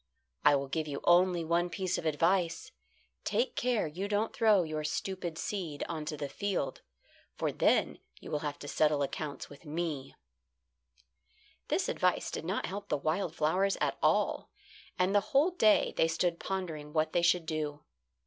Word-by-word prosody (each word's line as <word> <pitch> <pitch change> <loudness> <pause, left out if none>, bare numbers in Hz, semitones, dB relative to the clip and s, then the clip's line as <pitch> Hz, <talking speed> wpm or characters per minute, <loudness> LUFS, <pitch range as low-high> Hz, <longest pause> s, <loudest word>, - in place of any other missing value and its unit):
"I 145 - +6
will 140 0 -1
give 155 +3 -2
you 140 -1 -4
only 175 -1 +4
one 170 +2 +1
piece 185 +1 -1
of 165 - -3
advice: 170 - +1 0.5
take 485 - 0
care 245 -3 +1
you 175 +6 -4
don't 210 +2 0
throw 215 -5 +4
your 155 -1 -3
stupid 175 +2 -3
seed 170 -8 -3
on 160 -2 -4
to 150 0 -4
the 145 - -3
field, 190 0 -2 0.5
for - - -1
then - - +2 0.2
you - - -10
will 150 - 0
have 145 -1 -4
to 145 - -7
settle 150 -1 +2
accounts 145 +1 -4
with 145 +1 -14
me." 155 -3 -4 1.5
This - - 0
advice - - +1
did - - -5
not - - -1
help 200 +2 -6
the - - +1
wild 160 +3 -1
flowers 185 +6 +2
at - - -1
all, - - +2 0.5
and 185 +2 +2
the 205 - +5
whole 300 +7 +5
day 220 -12 +4
they 165 - +3
stood 170 +1 0
pondering 160 -6 -4
what 155 -1 +1
they 175 - +3
should 175 0 +3
do. 155 -2 -3
165 Hz, 170 wpm, -31 LUFS, 150-190 Hz, 1.5 s, I